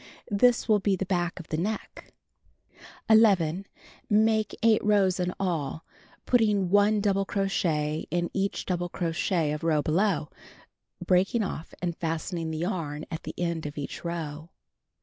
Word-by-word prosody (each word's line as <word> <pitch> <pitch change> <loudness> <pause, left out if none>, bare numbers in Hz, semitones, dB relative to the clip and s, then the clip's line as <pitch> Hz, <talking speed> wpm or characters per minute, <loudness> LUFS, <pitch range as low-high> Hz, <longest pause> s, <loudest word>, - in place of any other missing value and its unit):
This 240 +4 +3
will 215 -2 +4
be 195 0 +1
the 190 - -3
back 175 -1 -1
of 170 - -11
the 155 - -1
neck. 210 +6 -4 1.0
11. 195 -5 +4 0.4
Make 215 0 +2
8 225 -1 +4
rows 200 -3 +3
in 180 0 0
all, 160 -5 -2 0.4
putting 210 -6 +2
1 205 +1 +4
double 195 -1 +2
crochet 165 -7 -1
in 175 +1 -1
each 195 0 -1
double 175 -1 -2
crochet 165 -1 -1
of 150 +1 -4
row 155 -3 +2
below, 170 -1 +1 0.8
breaking 190 +5 +2
off 170 -4 -6
and 175 -2 -1
fastening 165 0 -3
the 160 - -3
yarn 160 -4 -3
at 160 - -5
end 170 -3 -2
of 150 - -9
each 140 - -6
row. 160 -2 -5
180 Hz, 145 wpm, -27 LUFS, 160-200 Hz, 1.0 s, will